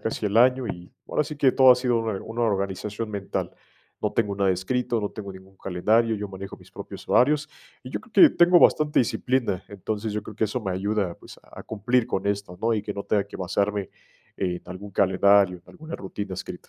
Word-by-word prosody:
casi 110 -1 -2
el 105 +2 -1
año, 125 +1 +4
y 90 -3 -7 0.2
ahora 150 - +1
sí 150 0 -7
que 135 -3 +3
todo 130 -1 +7
ha - - +9
sido 125 -2 +1
una 110 -4 -3
una 115 +2 -6
organización 100 +1 -2
mental, 100 -2 -3 0.5
no - - 0
tengo 105 -3 0
nada 100 -1 +2
escrito, 120 +6 -1
no 105 - -2
tengo 100 -2 -8
ningún 95 +1 -15
calendario, 110 +6 +1
yo 105 -1 -5
manejo 95 0 -8
mis - - -18
propios - - -10
horarios, 150 +4 +3 0.3
y 130 - -9
yo - - -3
creo 290 +8 +6
que - - -11
tengo 175 +1 +6
bastante 150 -3 +4
disciplina, 125 -4 0
entonces, 105 +2 -4
yo 105 0 -3
creo 105 - -10
que 110 - +1
eso 110 +4 -2
me 95 -4 -3
ayuda, 100 -1 -1
pues, - - -14
a - - -12
cumplir 115 +3 0
con 95 - -2
esto, 100 -3 -3
¿no?, 115 +1 +2
y 105 - -2
que 105 0 -4
no 100 - -6
tenga 100 -2 +1
que - - -10
basarme 100 +2 -1 0.5
en 90 -2 -2
algún 95 +3 -8
calendario, 95 0 +4
en - - -27
alguna 160 -1 -8
rutina 95 0 -6
escrita. 95 - -8
105 Hz, 215 wpm, -25 LUFS, 95-120 Hz, 0.5 s, ha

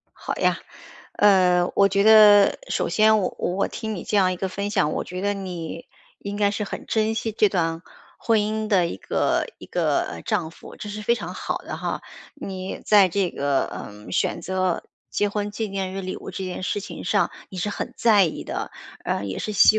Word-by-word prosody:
好 - - -4
呀， - - +2 0.6
呃， 180 -3 +4
我 200 0 +5
觉 200 +1 +2
得， 210 -2 +7
首 - - 0
先 215 0 +4
我 185 - -1
我 190 +3 0
听 220 -1 -5
你 175 - -6
这 215 -2 -1
样 185 -2 +4
一 - - -4
个 190 +2 -2
分 200 +2 -3
享， 150 -6 +1
我 - - -2
觉 180 +1 -6
得 205 +1 0
你 175 -4 -6 0.3
应 200 0 -5
该 205 -1 +2
是 210 +1 -2
很 - - -7
珍 220 0 +1
惜 225 0 -2
这 210 -1 +3
段 165 -3 -1 0.4
婚 225 -2 +2
姻 215 +1 -1
的 185 -5 +3
一 135 - -5
个 - - 0
一 - - -11
个， - - +1
呃， 85 -1 -7
丈 160 -2 -1
夫， - - -13
这 210 - -7
是 210 +1 -6
非 235 - +3
常 235 - -6
好 - - -3
的 - - -7
哈。 - - -3 0.3
你 190 -9 -6
在 205 -3 +6
这 185 0 0
个， 140 -1 0
嗯， 105 +1 -9
选 - - 0
择 185 -2 -1 0.3
结 205 - +1
婚 205 0 -2
纪 215 +1 -3
念 190 -1 -3
日 195 - -4
礼 185 0 -4
物 - - -8
这 190 - -5
件 185 0 -5
事 200 +2 -1
情 - - -8
上 200 +2 +2 0.2
你 185 - -7
是 210 - -1
很 205 - -4
在 210 -5 +5
意 160 - -3
的， - - -4 0.3
呃， 100 - -1
也 95 - -4
是 215 - -3
希 215 +2 +6
200 Hz, 230 characters per minute, -24 LUFS, 180-210 Hz, 0.6 s, 得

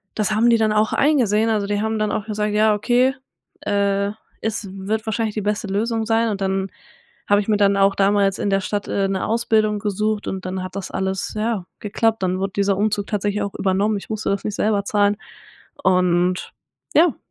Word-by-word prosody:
das 215 -1 0
haben 225 +3 +3
die 230 - +5
dann 220 -1 +2
auch 215 +1 +2
eingesehen, 230 -7 +3
also 210 -2 0
die 205 0 0
haben 220 0 -1
dann 215 0 0
auch 215 -2 -2
gesagt: 210 -1 -1
„Ja, 215 0 +4
okay, 245 +5 +2 0.5
äh, 200 0 0 0.3
es 220 -1 -2
wird 210 +3 -3
wahrscheinlich 220 -1 -2
die 215 - -1
beste 210 +1 -1
Lösung 220 +3 -1
sein.“ 225 +1 +2
Und 200 -2 -3
dann 195 0 -1 0.6
habe 205 0 +4
ich 200 - -7
mir 210 - +3
dann 200 -1 +3
auch 195 0 +4
damals 195 -1 +2
in 205 - 0
der 195 0 +2
Stadt, 205 +1 -3
äh, 195 -1 0
'ne 195 -1 -1
Ausbildung 215 -2 +1
gesucht 210 +1 -1
und 190 -1 -4
dann 185 0 -3
hat 185 0 -8
das 195 - -5
alles, 190 0 -2
ja, 215 -4 -1
geklappt. 220 0 0
Dann 185 0 0
wurde 195 0 -2
dieser 200 -1 +1
Umzug 205 -1 0
tatsächlich 205 0 -1
auch 200 - -4
übernommen. 200 +2 +1
Ich 200 - -10
musste 215 0 -2
das 200 - -2
nicht 210 - -2
selber 210 -2 +1
zahlen 205 0 +2 0.7
und 180 -1 +2 0.4
ja. 320 -3 +4
205 Hz, 205 wpm, -21 LUFS, 195-220 Hz, 0.7 s, die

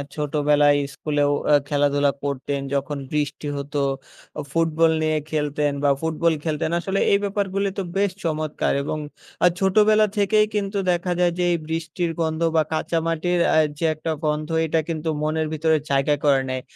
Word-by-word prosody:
ছোটবেলায় 145 -1 +3 0.2
স্কুলেও 145 -1 0 0.2
আ - - +6
খেলাধুলা 145 -1 +2
করতেন 140 0 -2
যখন 140 +1 -1
বৃষ্টি 150 0 -2
হতো, 140 +1 -3 0.6
আ - - -1
ফুটবল 165 0 +2
নিয়ে 155 0 +1
খেলতেন 150 -1 0
বা 145 - +4
ফুটবল 160 +1 +1
খেলতেন। 160 0 -1
আসলে 195 +2 -2
এই 200 - +5
ব্যাপারগুলি 200 0 -1
তো 195 - -1
বেশ 200 -1 +2
চমৎকার! 155 -2 -1
এবং 155 - -3 0.5
আ - - +8
ছোটবেলা 215 +2 +4
থেকেই 210 +1 +3
কিন্তু 200 0 -1
দেখা 175 +1 -1
যায় 175 -1 +3
যে 180 - 0
এই 170 - +2
বৃষ্টির 165 +1 -2
গন্ধ 160 0 -1
বা 160 - +5
কাঁচা 165 +1 0
মাটির 175 +2 0 0.2
আ - - +4 0.2
যে 165 - 0
একটা 160 +2 -3
গন্ধ 150 +1 -1 0.2
এটা 160 +1 +1
কিন্তু 160 0 -2
মনের 155 0 0
ভিতরে 160 0 +2
জায়গা 140 +2 +2
করে 135 -2 +4
নেয়। 130 0 -2
155 Hz, 165 wpm, -23 LUFS, 145-175 Hz, 0.6 s, আ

